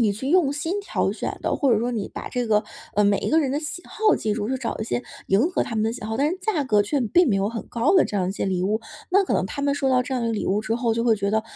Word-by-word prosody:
你 215 -3 +3
去 260 +7 -5
用 335 -6 +4
心 325 +8 -2
挑 400 - -1
选 - - -4
的。 - - 0
或 270 -4 +2
者 215 - +3
说 240 - -1
你 220 -5 -3
把 - - -5
这 245 -1 -2
个 210 -1 +3 0.3
呃， 210 - +3
每 200 -1 +3
一 - - -2
个 320 - +4
人 275 -4 0
的 285 - 0
喜 305 +3 -4
好 435 -1 +2
记 215 - -1
住， 210 +1 -2
去 265 - 0
找 245 -3 -4
一 215 - -3
些 245 - -2 0.2
迎 220 - +3
合 370 - 0
他 225 - -6
们 215 - +1
的 225 +1 0
喜 - - -8
好， 220 +1 -3
但 290 +4 +2
是 365 - -4
价 365 -8 0
格 210 -6 +3
却 275 +8 0
并 280 - +3
没 205 - +2
有 195 +1 +1
很 230 0 -6
高 245 +10 +2
的 365 - +6
这 205 - -3
样 185 -1 0
一 - - -2
些 - - -3
礼 185 -2 0
物， 215 +4 0 0.3
那 395 +1 +4
可 - - -1
能 - - +1
他 280 - -5
们 280 0 +1
收 275 -2 0
到 255 -1 +4
这 265 +1 -3
样 250 - -1
一 - - 0
个 - - 0
礼 215 - -2
物 200 +2 +1
之 225 +1 -1
后， 235 -2 0
就 230 - 0
会 230 -2 +3
觉 200 0 -1
得， 220 0 +2
235 Hz, 370 characters per minute, -24 LUFS, 215-285 Hz, 0.3 s, 的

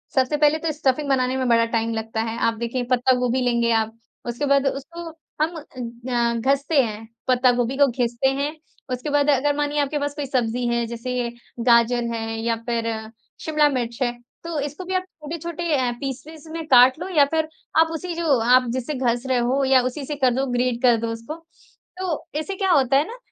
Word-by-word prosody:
सबसे 265 +3 +2
पहले 300 +1 +4
तो 325 -1 -1
स्टफिंग 280 -1 0
बनाने 260 -1 +1
में 260 - 0
बड़ा 230 0 +4
टाइम 230 0 -1
लगता 220 0 -3
है। 225 0 -3
आप 230 -1 +1
देखिए, 235 +2 -2
पत्ता 255 +1 +4
गोभी 250 +1 +1
लेंगे 235 -1 +2
आप, 225 0 0 0.3
उसके 240 +4 -2
बाद 280 0 +3
उसको 330 +5 -5 0.3
हम 325 +3 +1
अ, 310 -2 -8
ग 235 0 -2
घसते 280 +2 +3
हैं, 220 -1 -6 0.2
पत्ता 250 0 +4
गोभी 245 +2 -1
को 285 -1 +6
घिसते 240 0 0
हैं। 295 +2 -2 0.4
उसके 255 +4 -4
बाद, 290 0 +2
अगर 285 +1 +2
मानिए, 295 0 0
आपके 290 +1 -1
पास 285 0 -2
कोई 290 - -3
सब्ज़ी 245 -2 -1
है, 235 0 0
जैसे 240 +1 -3 0.4
गाजर 235 0 +4
है 225 0 -3
या 230 0 +1
फिर 230 -1 0 0.5
शिमला 305 -1 +3
मिर्च 240 -3 -3
है, 240 - +2 0.3
तो 335 -3 -3
इसको 290 +5 -4
भी 375 - -4
आप 370 - +1 0.2
छोटे-छोटे 335 +2 -4
अ, 250 -2 +1
पीसेज़ 290 +4 -7
में 325 -1 -5
काट 255 +2 +6
लो 360 - -4
या 285 - +7
फिर 315 -1 +1 0.3
आप 320 0 +6
उसी 345 +2 -4
जो 320 -6 +2
आप 250 +2 +5
जिससे 260 +4 -3
घस 240 -2 0
रहे 260 -1 +2
हो 255 +3 +1
या 260 -1 +5
उसी 255 +3 -3
से 295 +2 -4
कर 260 -3 +2
दो, 265 +2 0
ग्रेट 245 0 0
कर 240 -2 +5
दो 230 - -1
उसको। 230 +7 -6 0.6
तो 360 -5 -3
इससे 385 +5 -4
क्या 385 -1 +1
होता 270 -3 +4
है 295 +4 +1
ना 470 - -8
260 Hz, 210 wpm, -23 LUFS, 240-295 Hz, 0.6 s, या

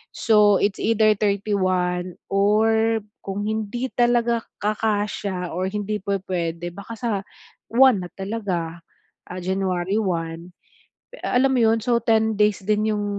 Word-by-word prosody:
So, 210 -3 +4
it's 200 -1 0
either 220 -1 +3
31 185 -4 0 0.2
or 220 +3 +3 0.2
kung 200 +1 -4
hindi 220 +4 -3
talaga 240 -1 +2 0.2
kakasiya 205 -3 -1
or 185 +2 -2
hindi 210 +1 -3
pu-puwede 175 -3 -3
baka 200 +5 -9
sa 235 +1 -3 0.6
1 250 -3 +5
na - - -25
talaga, 190 -5 -3 0.5
ah, 180 - -6
January 190 +1 -1
1. 170 -2 -3 0.6
Eh, - - -12
alam 265 +2 +2
mo 255 - +2
'yon. 225 -1 +3
So, 235 -1 +2
10 220 -1 +2
days 210 -2 +2
din 215 +1 +1
yung 205 - -2
205 Hz, 130 wpm, -23 LUFS, 185-220 Hz, 0.6 s, 1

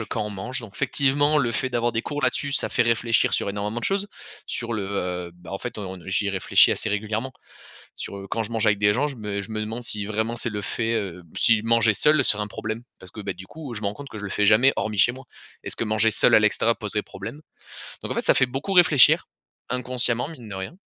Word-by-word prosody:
heu, 110 - -5
quand 110 - -2
on 105 - -5
mange. 105 +7 -4
Donc 115 -4 -11
effectivement 145 +2 +2
le 125 -5 +1
fait 130 - -1
d'avoir 120 -1 0
des 115 - 0
cours 145 +4 -5
là-dessus 140 -1 0
ça - - +1
fait - - 0
réfléchir 115 0 +2
sur - - 0
énormément 105 +3 -3
de - - -5
choses. 195 +1 -1 0.4
Sur 120 -1 -4
le, 110 -3 -2
heu, 90 -3 -3
bah 90 -1 -13
en 95 - -3
fait 120 +2 -6
on 95 -3 -5
n 90 - -12
j'y 100 +2 0
réfléchis 95 -2 +4
assez - - -2
régulièrement, 110 +4 -2 0.6
sur, - - -7
heu, 100 0 -8
quand 115 - -1
je 110 - -6
mange 115 -1 0
avec 100 -1 +3
des 105 0 +4
gens 135 +7 +1
je 145 - -5
me 105 -3 -4
je 100 - -9
me 110 - -1
demande 110 +3 -4
si 105 -2 -1
vraiment 110 +3 -1
c'est 120 0 -3
le 105 -1 -4
fait, 115 +3 -1
heu 95 -5 -3
si 110 -2 +3
manger 115 -1 +3
seul 150 +3 +4
serait 105 0 +4
un 105 - -4
problème. 110 +2 -5 0.2
Parce 95 - -9
que, 110 - -8
beh, 100 -3 -4
du 95 +1 -11
coup, 150 -4 -8
heu, - - -5
je - - -4
me - - -1
rends 100 - -2
compte 140 +5 -10
que 110 - -9
je - - -8
le 95 - -5
fais 105 +1 +1
jamais 120 +7 +6
hormis 110 -1 -2
chez 115 - +5
moi. 130 +1 -11 0.4
Est-ce - - +1
que - - -2
manger 110 +1 +2
seul - - +4
à - - +6
l'extérieur 110 +2 +2
poserait 105 -1 -1
problème? 150 - -8 0.6
Donc, - - -4
en - - -1
fait - - 0
ça - - +4
fait - - +4
beaucoup 135 +10 -3
réfléchir, 160 -7 +6 0.4
inconsciemment 125 0 0
mine 125 -9 -10
de 100 - -6
rien. 95 - -6
110 Hz, 265 wpm, -24 LUFS, 105-125 Hz, 0.6 s, jamais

